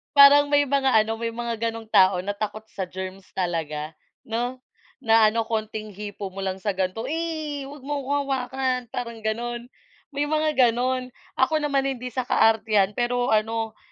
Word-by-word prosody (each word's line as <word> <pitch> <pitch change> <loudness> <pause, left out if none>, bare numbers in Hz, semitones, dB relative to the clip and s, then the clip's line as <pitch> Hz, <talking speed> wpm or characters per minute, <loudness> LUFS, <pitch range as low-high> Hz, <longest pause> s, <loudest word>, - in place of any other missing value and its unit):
Parang 285 +1 +8
may 290 0 +4
mga 275 -1 +2 0.2
ano, 225 +1 -2
may 230 - -1
mga 230 0 -2
ganung 225 0 -7
tao 185 -2 +5
na 205 - -1
takot 215 +1 -5
sa 185 -2 -5
germs 190 0 -7
talaga, 160 -4 -2 0.3
'no, 240 +3 -2 0.5
na 225 -1 +6
ano, 225 +1 -1
konting 215 -1 -4
hipo 205 -1 -7
mo 195 - -6
lang 190 -1 -2
sa 200 +1 -2
ganito, 185 +4 -2
"Eh, 315 -2 -3
'wag 285 -1 -11
mo 290 0 -2
akong 275 +1 -2
hawakan," 260 -1 -1
parang 235 -2 -5
gano'n, 240 +2 -3 0.4
may 285 0 -1
mga 310 +1 +1
gano'n. 250 +1 +2 0.2
Ako 310 +4 +2
naman, 280 -2 +1
hindi 255 -2 -3
sa 250 +1 -3
kaartehan 215 -4 +3
pero 245 0 +1
ano, 220 0 0
230 Hz, 170 wpm, -24 LUFS, 215-265 Hz, 0.5 s, Parang